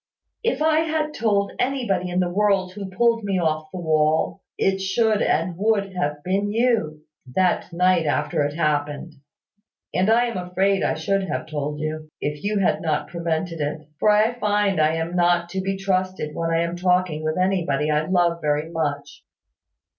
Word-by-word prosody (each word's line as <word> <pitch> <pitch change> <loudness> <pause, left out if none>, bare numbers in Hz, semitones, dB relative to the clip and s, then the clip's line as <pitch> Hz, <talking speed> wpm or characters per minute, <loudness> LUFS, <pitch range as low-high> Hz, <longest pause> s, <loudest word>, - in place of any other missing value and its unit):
If 465 -9 0
I 315 0 +4
had 315 -1 -1
told 205 -5 +1
anybody 235 -9 0
in 180 +1 +1
the 175 -1 -1
world 195 -2 +2
who 200 -1 -6
pulled 230 +3 +2
me 195 -2 0
off 155 -2 -1
the - - -7
wall, 155 +2 +1 0.2
it 195 0 +1
should 210 +3 +1
and 170 +2 +1
would 200 -2 +1
have 150 -5 -2
been 195 +3 0
you, 220 -10 +1 0.3
that 185 0 +1
night 180 -1 +2
after 145 0 0
it 145 +1 -2
happened: 150 0 -1 0.8
and 185 +3 +2
I 235 +2 +4
am 235 -4 -3
afraid 190 +2 +1
I - - +1
should 190 +4 -1
have - - -2
told 150 -1 -4
you, 155 0 -4
if 150 0 -4
you 210 +1 0
had 195 - +1
not 155 -2 -1
prevented 170 -1 -2
it: 150 +1 -4
for 215 - +3
I 215 +3 +4
find 205 -5 +1
I 155 +1 +3
am 165 +2 -3
not 175 -1 +2
to 190 +1 -3
be 195 +1 -2
trusted 185 -5 -1
when 165 +1 -2
I 165 0 +2
am 170 +1 -3
talking 180 -3 +1
with 155 +1 -1
anybody 170 -6 +1
I 150 +1 +1
love 175 -2 +2
very 150 +2 -1
much. 145 -3 -3
180 Hz, 180 wpm, -23 LUFS, 155-200 Hz, 0.8 s, I